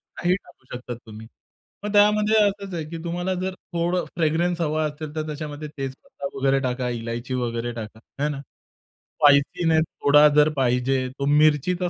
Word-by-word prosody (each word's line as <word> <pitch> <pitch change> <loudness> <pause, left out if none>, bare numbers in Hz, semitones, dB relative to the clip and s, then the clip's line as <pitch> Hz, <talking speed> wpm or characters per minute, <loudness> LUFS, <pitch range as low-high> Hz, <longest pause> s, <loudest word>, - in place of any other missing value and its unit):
काही 175 +1 +1
टाकू 155 -8 -14
शकता 125 0 -6
तुम्ही. 110 -1 -12 0.6
मग 210 - -2
त्यामध्ये 210 +1 +4
असच 200 -1 -5
आहे, 165 -2 -3
की 165 - -6
तुम्हाला 175 +2 -2
जर 190 0 -2 0.2
थोडं 175 +1 0
फ्रेग्रन्स 170 +1 +1
हवा 155 -1 0
असेल, 150 0 -6
तर 155 -1 -2
त्याच्यामध्ये 150 0 -6
तेज 135 -1 -3
पत्ता 140 - -7
वगैरे 135 0 +2
टाका, 125 -1 -2
इलायची 120 +1 -4
वगैरे 120 -1 -2
टाका, 110 -1 -8 0.2
आहे 145 +1 +1
ना. 145 -2 -4 0.8
स्पायसीनेस 155 +3 +4 0.2
थोडा 145 +1 +7
जर 150 0 +6
पाहिजे, 130 -1 +1 0.2
तो 140 - -1
मिरचीचा 155 +5 +3
150 Hz, 160 wpm, -24 LUFS, 130-170 Hz, 0.8 s, थोडा